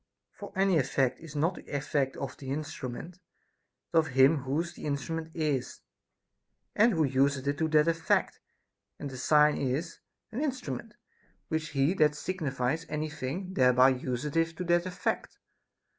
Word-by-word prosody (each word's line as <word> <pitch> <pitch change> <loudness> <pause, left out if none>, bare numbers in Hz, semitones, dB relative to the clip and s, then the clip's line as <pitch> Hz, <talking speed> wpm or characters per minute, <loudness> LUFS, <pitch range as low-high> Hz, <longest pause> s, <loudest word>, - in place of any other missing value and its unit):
For - - -9
any 190 -3 +3
effect 135 -1 +1
is 160 -3 -11
not 160 +5 +2
the - - -12
effect 140 -1 -1
of 135 -2 -5
the 135 - -8
instrument, 150 +3 -5 0.7
but 165 - +5
of 160 - +1
him 135 +3 +5
whose 145 +6 -2
the - - -9
instrument 160 +3 -3
is, 150 -6 -1 0.9
and 225 +2 +5
who 160 -3 +2
useth 135 0 +2
it 140 0 -1
to 160 - +2
that 155 0 +4
effect; 165 -1 +1 0.6
and 140 - -6
a 130 - -7
sign 150 +3 +4
is 140 +6 -2 0.3
an 235 +5 -3
instrument, 265 -5 -4 0.5
which 160 -1 -2
he 140 +6 +3
that 150 -5 +3
signifies 150 -4 -2
any 150 0 -2
thing 165 +7 -4
thereby 125 -2 +5
useth 140 +6 -1
to 180 - -4
that 175 +1 +2
effect. 180 -1 -3
150 Hz, 155 wpm, -29 LUFS, 135-165 Hz, 0.9 s, but